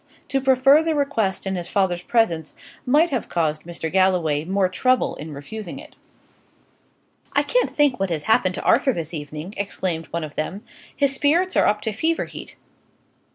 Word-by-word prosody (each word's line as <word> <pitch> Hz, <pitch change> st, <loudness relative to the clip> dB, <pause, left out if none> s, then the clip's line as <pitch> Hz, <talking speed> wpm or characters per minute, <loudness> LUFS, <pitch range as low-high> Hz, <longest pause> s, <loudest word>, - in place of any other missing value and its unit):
To 270 Hz, -, 0 dB
prefer 270 Hz, +3 st, +5 dB
the 320 Hz, -1 st, 0 dB
request 230 Hz, -11 st, 0 dB
in 190 Hz, 0 st, -2 dB
his 175 Hz, -1 st, -4 dB
father's 185 Hz, -3 st, 0 dB
presence 175 Hz, -8 st, 0 dB, 0.3 s
might 300 Hz, +6 st, +4 dB
have 255 Hz, -5 st, -2 dB
caused 155 Hz, -3 st, -1 dB
Mr. 170 Hz, -2 st, -5 dB
Galloway 180 Hz, -6 st, +2 dB
more 190 Hz, +1 st, +1 dB
trouble 255 Hz, +8 st, +1 dB
in 155 Hz, +1 st, -8 dB
refusing 170 Hz, -, -7 dB
it. 305 Hz, +2 st, -12 dB, 1.4 s
"I -, -, +3 dB
can't -, -, +1 dB
think 290 Hz, -6 st, +2 dB
what 195 Hz, -1 st, 0 dB
has 160 Hz, -3 st, -2 dB
happened 185 Hz, -3 st, +2 dB
to -, -, -5 dB
Arthur 265 Hz, -, +3 dB
this 165 Hz, -3 st, -5 dB
evening!" 155 Hz, +4 st, -6 dB
exclaimed 185 Hz, -5 st, -3 dB
one 170 Hz, 0 st, -4 dB
of 155 Hz, -1 st, -7 dB
them. 190 Hz, +7 st, -4 dB, 0.3 s
"His 280 Hz, -1 st, +2 dB
spirits 335 Hz, +7 st, +1 dB
are -, -, +4 dB
up 210 Hz, 0 st, +1 dB
to 220 Hz, -, -2 dB
fever 320 Hz, +10 st, 0 dB
heat. -, -, -10 dB
195 Hz, 175 wpm, -22 LUFS, 170-270 Hz, 1.4 s, prefer